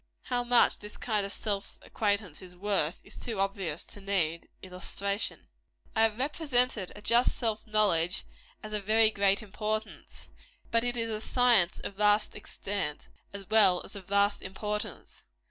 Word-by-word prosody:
How 245 -1 -1
much 245 0 +4
this 210 0 -10
kind 210 -4 -1
of - - -7
self 200 -1 -3
acquaintance 200 -6 -2
is 180 -1 -12
worth, 190 -4 0
is - - -13
too 225 -5 -5
obvious 195 -5 -2
to 205 - -11
need 175 -5 0
illustration. 200 +2 -3 0.5
I 220 - +2
have 225 -1 +2
represented 250 - +2
a 205 - -11
just 235 +3 +3
self 225 -2 -2
knowledge 195 -5 +2 0.4
as 215 0 -7
of 210 -1 -2
very 220 +2 +4
great 200 0 +2
importance; 215 +1 -5 0.4
but 230 0 +2
it 245 0 -2
is 230 -1 -2
a 215 0 -3
science 235 -8 +3
of 195 - -6
vast 210 0 +3
extent, 200 -6 -4 0.2
as 200 -1 -9
well 200 -5 +5
as - - -5
of 190 -3 -9
vast 200 +1 +3
importance. 210 +2 -5
210 Hz, 160 wpm, -29 LUFS, 195-220 Hz, 0.5 s, well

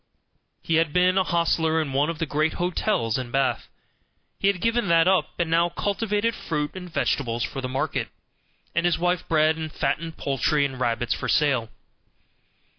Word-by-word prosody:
He 165 - +1
had 165 -2 +1
been 180 +1 +3
an 190 - +1
hostler 165 -1 +1
in 145 -4 -2
one 145 +3 +2
of 165 - -3
the 165 - -1
great 155 +2 0
hotels 175 - 0
in 125 -2 -5
Bath. 135 +1 0 0.7
He 195 - +1
had 200 -2 +2
given 230 +1 +1
that 165 0 +4
up, 190 -1 +3
and 170 -2 0
now 170 +1 +3
cultivated 210 +4 -1
fruit 150 -7 -3
and 180 -2 -8
vegetables 120 -7 -1
for 135 -2 -4
the 130 - -4
market, 135 +4 -2 0.7
and 170 +1 +2
his 175 - +1
wife 175 +1 0
bred 155 0 +3
and 160 -1 -5
fattened 165 +1 -2
poultry 140 +2 +1
and 135 -2 -5
rabbits 120 -1 0
for - - -4
sale. 140 -7 +2
160 Hz, 180 wpm, -24 LUFS, 140-175 Hz, 0.7 s, that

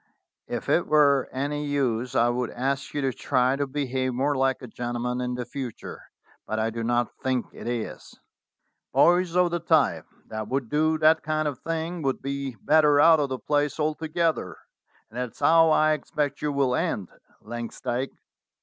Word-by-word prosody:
If - - -4
it - - +2
were 140 -3 +4
any 145 +3 -2
use 130 -3 -1
I 120 -1 +4
would 120 0 -1
ask 135 +2 -2
you 145 - 0
to 135 -2 0
try 125 +3 +1
to 140 0 -2
behave 130 -2 -2
more 140 +3 +1
like 135 0 0
a - - -6
gentleman 120 +1 -3
in 125 0 -2
the 125 0 -4
future, 125 -2 -7 0.5
but 110 - -2
I 110 +1 0
do 115 0 -4
not 120 0 0
think 130 -2 0
it - - -9
is. 120 -2 -5 0.8
Boys 175 0 +4
of 180 -1 +3
the 175 - -1
type 160 -3 +2 0.2
that 110 -1 -5
would 130 -2 -2
do 155 +1 +2
that 155 +1 +4
kind 155 0 -1
of 140 -4 -4
thing 165 +1 -3
would 135 -3 -1
be 140 -2 -4
better 150 -2 +5
out 160 +1 +7
of 145 -2 0
the 130 - -2
place 145 +2 -1
altogether, 160 +2 -1 0.5
and 120 - -6
that 125 -2 -3
is - - -20
how 165 0 +5
I 155 0 +4
expect 150 -1 -2
you 150 0 0
will 140 -3 +1
end, 100 -6 -1 0.3
Langsdyke. 120 +2 -4
140 Hz, 180 wpm, -26 LUFS, 125-155 Hz, 0.8 s, out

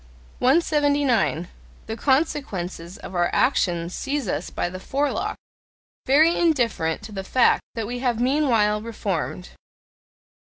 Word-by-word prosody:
179. 285 - +2 0.4
The 220 - -4
consequences 215 - -1
of - - -10
our 175 -1 +1
actions 175 -9 +1
seize 280 -4 -2
us - - -2
by - - -2
the 185 +1 -7
forelock, 280 +8 -1 0.7
very 310 +6 +5
indifferent 235 - +1
to 215 - -9
the 195 -2 -5
fact 250 +5 +3
that 225 -2 -2
we 245 +3 -4
have 245 -3 0
meanwhile 240 -6 +2
"reformed." 200 -5 -4
230 Hz, 120 wpm, -23 LUFS, 190-280 Hz, 0.7 s, very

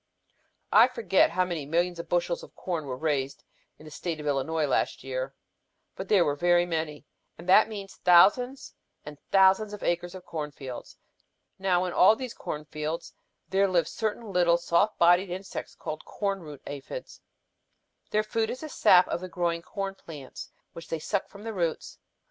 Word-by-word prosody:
"I - - +7
forget 450 - +2
how 185 +2 +1
many 170 -4 -3
millions 175 +2 0
of 170 - -7
bushels 175 0 0
of - - -14
corn 170 -5 -3
were 130 -2 -5
raised 140 -2 -2 0.3
in 155 - -15
the 155 - -11
state 165 +1 -4
of 150 - -7
Illinois 150 +2 0
last 135 - 0
year, 130 +1 -4 0.6
but 190 - -6
they 195 -4 +5
were 145 -2 0
very 175 +3 +3
many. 160 -3 -3 0.3
And 170 - -12
that 210 +4 +6
means 200 -3 -8
thousands 210 +10 +4 0.3
and 150 -1 -9
thousands 195 +2 +4
of 210 - -8
acres 175 +1 -1
of 185 - -10
corn 150 -2 -4
fields. 135 -4 -9 0.6
Now 185 -1 +2
in 180 - -3
all 210 +4 +6
these 255 0 -6
corn 150 0 -6
fields 155 +3 -5 0.4
there 195 +1 +3
live 175 -4 +2
certain 220 -1 -4
tiny 175 -1 +4
soft 170 +5 +1
bodied 175 +2 +4
insects 190 +2 -6
called 155 - -6
corn 200 -1 -2
root 150 -5 -11
aphids. 145 - -8 0.9
Their 215 0 +1
food 220 +1 -1
is 255 - -5
the 310 - -6
sap 180 -9 +5
of - - -3
the 185 - -6
growing 170 -2 -1
corn 195 +2 -4
plants 150 -8 -10 0.2
which 165 -1 -10
they 165 - -2
suck 190 +5 -2
from 200 +1 -13
the 225 0 -5
roots. 170 -5 -3
175 Hz, 180 wpm, -27 LUFS, 155-195 Hz, 0.9 s, I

